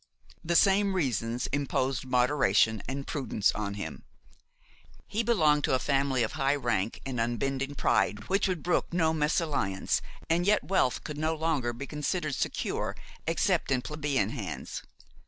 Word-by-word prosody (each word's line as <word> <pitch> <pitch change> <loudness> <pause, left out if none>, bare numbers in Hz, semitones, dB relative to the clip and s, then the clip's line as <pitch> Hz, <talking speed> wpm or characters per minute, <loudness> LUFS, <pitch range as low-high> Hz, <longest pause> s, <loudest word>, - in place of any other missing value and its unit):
The 170 +1 0
same 195 +1 +4
reasons 120 - -1
imposed 135 -2 0
moderation 125 -4 +3
and 135 +2 -4
prudence 130 -8 0
on 100 -2 -3
him. 100 - -6 1.0
He 215 +3 -1
belonged 155 -11 +3
to - - +2
a - - +3
family 135 -2 +1
of 110 - -1
high 135 +1 +1
rank 115 -6 -1
and 130 -3 -3
unbending 135 +4 -1
pride 105 -5 +1
which 195 +2 +2
would 180 -5 -2
brook 175 - 0
no 160 -2 +2
mésalliance, 150 - 0 0.3
and 175 +3 +1
yet 210 - +4
wealth 185 -10 +1
could 150 -1 -6
no 160 +1 0
longer 155 -6 0
be 120 +4 -6
considered 150 +2 -2
secure - - -2 0.3
except - - +1
in 125 -2 +1
plebeian 145 -8 -1
hands. 100 - -5
140 Hz, 150 wpm, -29 LUFS, 120-160 Hz, 1.0 s, same